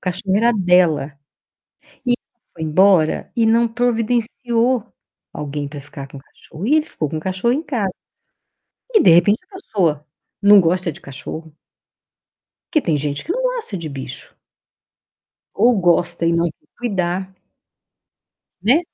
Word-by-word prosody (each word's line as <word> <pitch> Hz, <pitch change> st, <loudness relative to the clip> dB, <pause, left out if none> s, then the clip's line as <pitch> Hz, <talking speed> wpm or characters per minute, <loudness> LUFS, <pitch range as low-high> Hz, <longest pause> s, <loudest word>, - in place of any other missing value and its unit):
cachorro 190 Hz, +1 st, -1 dB
era 235 Hz, +3 st, +3 dB
dela. 180 Hz, -8 st, +2 dB, 0.9 s
E 245 Hz, -, +3 dB
ela 240 Hz, 0 st, -6 dB
foi 160 Hz, -, -9 dB
embora 170 Hz, 0 st, +3 dB
e 230 Hz, -2 st, +2 dB
não 230 Hz, +1 st, +4 dB
providenciou 240 Hz, +1 st, 0 dB, 0.5 s
alguém 145 Hz, 0 st, -4 dB
para 145 Hz, 0 st, -8 dB
ficar 140 Hz, 0 st, -9 dB
com 140 Hz, 0 st, -11 dB
o -, -, -12 dB
cachorro, 160 Hz, +5 st, -10 dB
e 285 Hz, -, +3 dB
ele 310 Hz, 0 st, +1 dB
ficou 155 Hz, -, -3 dB
com 160 Hz, -, -4 dB
o -, -, -3 dB
cachorro 190 Hz, +8 st, 0 dB
em 295 Hz, -, -2 dB
casa. 230 Hz, -11 st, -2 dB, 1.0 s
E 435 Hz, -, +6 dB
de -, -, +6 dB
repente 185 Hz, +6 st, +5 dB
a 400 Hz, -, -14 dB
pessoa 170 Hz, -, -1 dB, 0.4 s
não 205 Hz, 0 st, +8 dB
gosta 180 Hz, 0 st, +1 dB
de -, -, -12 dB
cachorro. 150 Hz, +3 st, -9 dB, 1.2 s
Que 310 Hz, -, +3 dB
tem 165 Hz, -, 0 dB
gente 145 Hz, 0 st, -2 dB
que 345 Hz, -, -2 dB
não -, -, -2 dB
gosta -, -, -2 dB
de 165 Hz, -3 st, -5 dB
bicho. 135 Hz, -3 st, -8 dB, 1.2 s
Ou 230 Hz, +2 st, +4 dB
gosta 175 Hz, -1 st, +1 dB
e 165 Hz, -, +3 dB
não 170 Hz, 0 st, +2 dB
quer 150 Hz, -, -24 dB
cuidar. 190 Hz, -5 st, -2 dB, 1.3 s
Né. 250 Hz, -, +4 dB
185 Hz, 150 wpm, -19 LUFS, 160-235 Hz, 1.3 s, não